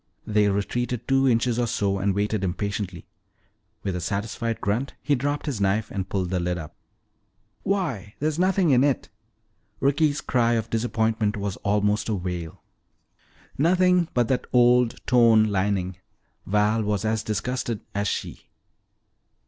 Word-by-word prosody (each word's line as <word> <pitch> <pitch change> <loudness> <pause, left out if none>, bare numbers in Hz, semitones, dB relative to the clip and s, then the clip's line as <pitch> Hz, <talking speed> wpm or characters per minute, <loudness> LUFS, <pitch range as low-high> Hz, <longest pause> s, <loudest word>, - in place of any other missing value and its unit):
They 105 -1 +2
retreated 120 +4 -2
two 135 0 +3
inches 120 0 +2
or 120 - +1
so 100 -2 0
and 95 0 0
waited 105 0 0
impatiently. 95 -1 -3 0.8
With 95 -2 -2
a 90 - -3
satisfied 105 +5 -3
grunt 115 +7 -2
he 145 - 0
dropped 145 +2 -1
his 135 -9 -3
knife 100 +3 +1
and 95 -2 -4
pulled 95 -2 -2
the 90 - 0
lid 90 0 -1
up. 80 -3 -8 0.9
"Why, 155 - -2
there's 155 +2 -1
nothing 185 -3 +3
in 130 0 +5
it!" 140 -2 0 0.7
Ricky's 145 +2 +2
cry 120 -2 +1
of 115 -1 -2
disappointment 110 -2 0
was 100 -2 -3
almost 105 +1 0
a 110 - +1
wail. 90 -3 -5 1.0
"Nothing 180 +2 +3
but 120 -2 +2
that 130 - 0
old 125 -1 +3
torn 115 -3 +5
lining." 95 -2 -1 0.5
Val 105 +2 +2
was 105 0 -1
as 110 0 0
disgusted 115 +1 -3
as 100 0 -1
she. - - -4
110 Hz, 145 wpm, -25 LUFS, 100-125 Hz, 1.0 s, in